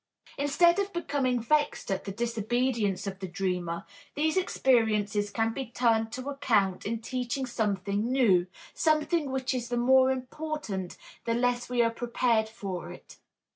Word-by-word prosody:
Instead 340 +6 +3
of 400 0 -1
becoming 280 -7 0
vexed 295 -2 0
at 190 - -2
the 200 - -4
disobedience 230 -1 -1
of 195 -1 -5
the 190 - -4
dreamer, 180 -2 -2 0.3
these 310 +3 +1
experiences 215 - +2
can 225 +2 0
be 265 0 -4
turned 225 -2 +1
to 255 +3 -6
account 220 -10 +1
in 225 +1 -2
teaching 250 +2 -3
something 205 -1 -1
new, 200 -9 +4 0.3
something 310 -1 +1
which 265 0 -1
is 245 -1 -3
the 240 - -1
more 260 +2 +5
important 260 - -4 0.3
the 230 - +1
less 245 0 0
we 245 -1 +3
are 230 - +2
prepared 230 -1 +1
for 195 -5 -6
it. - - -13
240 Hz, 150 wpm, -28 LUFS, 205-265 Hz, 0.3 s, more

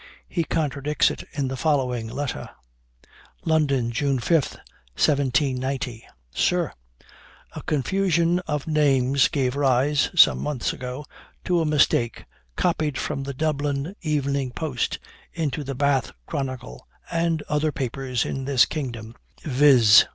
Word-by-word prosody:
He 170 - -1
contradicts 150 -2 0
it - - -7
in 140 -2 -2
the 135 - -3
following 125 -5 0
letter: 130 +4 -4 1.0
"London, 140 -7 +1
June 135 +3 0
5, 150 +4 +1 0.4
1790. 130 -3 0 0.3
"Sir 175 - +1 0.8
A - - -5
confusion 170 +3 +1
of 150 -2 -2
names 140 -4 +3
gave 135 -4 -1
rise, 140 +1 +2
some 175 - +6
months 145 -5 -2
ago, 130 +3 -6 0.4
to 175 -1 +2
a - - 0
mistake 140 -6 +2 0.3
copied 155 -5 0
from 135 - -3
the 140 0 -5
Dublin 145 +3 -1
Evening 140 -4 -1
Post 130 -1 -2 0.4
into 150 -3 -2
the 135 0 -5
Bath 140 -1 +1
Chronicle, 130 - -5 0.2
and 165 -2 0
other 150 +1 0
papers 130 -2 -2
in 135 -1 -4
this 135 -3 +4
kingdom, 120 -7 -5 0.3
viz. 130 -7 +6
140 Hz, 120 wpm, -24 LUFS, 130-150 Hz, 1.0 s, some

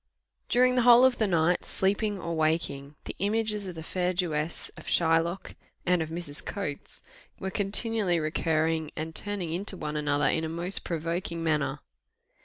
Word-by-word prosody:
During 250 +1 +4
the 250 - +3
whole 245 +1 +8
of 260 -1 +2
the 215 - +2
night, 175 -1 +2
sleeping 205 +1 +1
or 170 -1 -4
waking, 155 -3 -1
the - - -6
images 210 0 0
of 180 - -6
the 160 - -7
fair 180 +2 -1
Jewess, 165 -3 -2
of - - -12
Shylock, 165 +2 +1 0.3
and 180 -1 +3
of 160 - -3
Mrs. 160 -3 -4
Coates, 155 -8 -5 0.4
were 190 - -3
continually 205 -2 +1
recurring, 160 0 0
and 160 +1 -4
turning 190 -4 -3
into 190 +2 -2
one 150 -2 -4
another 145 -1 +1
in 160 - +1
a 160 - -2
most 170 +4 0
provoking 170 0 -3
manner. 150 -3 0
170 Hz, 165 wpm, -28 LUFS, 160-200 Hz, 0.4 s, whole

